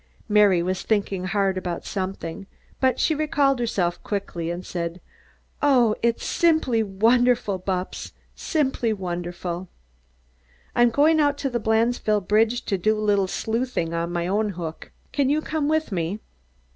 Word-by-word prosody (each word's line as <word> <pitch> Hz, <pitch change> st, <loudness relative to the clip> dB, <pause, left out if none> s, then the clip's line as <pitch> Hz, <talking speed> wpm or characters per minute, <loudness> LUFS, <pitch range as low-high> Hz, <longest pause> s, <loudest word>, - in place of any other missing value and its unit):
Mary 205 Hz, -5 st, +4 dB
was 185 Hz, +1 st, -2 dB
thinking 200 Hz, -3 st, -1 dB
hard 195 Hz, 0 st, +1 dB
about 175 Hz, -2 st, -5 dB
something, 190 Hz, -1 st, -4 dB, 0.3 s
but 260 Hz, -1 st, +2 dB
she 320 Hz, -, +3 dB
recalled 285 Hz, -3 st, +1 dB
herself 190 Hz, -7 st, -1 dB
quickly, 175 Hz, -5 st, -3 dB
and 175 Hz, +2 st, -5 dB
said: 170 Hz, 0 st, -4 dB, 0.6 s
"Oh! 250 Hz, -7 st, +4 dB
It's 235 Hz, 0 st, -1 dB
wonderful, 240 Hz, -, +3 dB
Bupps, 185 Hz, 0 st, -3 dB, 0.2 s
simply 265 Hz, -7 st, 0 dB
wonderful!" 175 Hz, -1 st, -4 dB, 1.1 s
"I'm 240 Hz, 0 st, +5 dB
going 305 Hz, +6 st, +4 dB
out 290 Hz, -1 st, +2 dB
to 275 Hz, -2 st, -2 dB
the 240 Hz, -, 0 dB
Blandesville 220 Hz, -2 st, +1 dB
bridge 220 Hz, +3 st, +2 dB
to 195 Hz, -3 st, -1 dB
do 215 Hz, +4 st, +2 dB
a -, -, -3 dB
little 205 Hz, -2 st, +2 dB
sleuthing 225 Hz, -5 st, -2 dB
on 170 Hz, +1 st, -2 dB
my 170 Hz, -1 st, -1 dB
own 205 Hz, +4 st, 0 dB
hook. 165 Hz, -2 st, -6 dB, 0.2 s
Can 280 Hz, -2 st, +1 dB
you 295 Hz, +2 st, +2 dB
come 310 Hz, -1 st, -2 dB
with 315 Hz, -4 st, 0 dB
me?" 180 Hz, +2 st, -2 dB
210 Hz, 145 wpm, -24 LUFS, 185-245 Hz, 1.1 s, I'm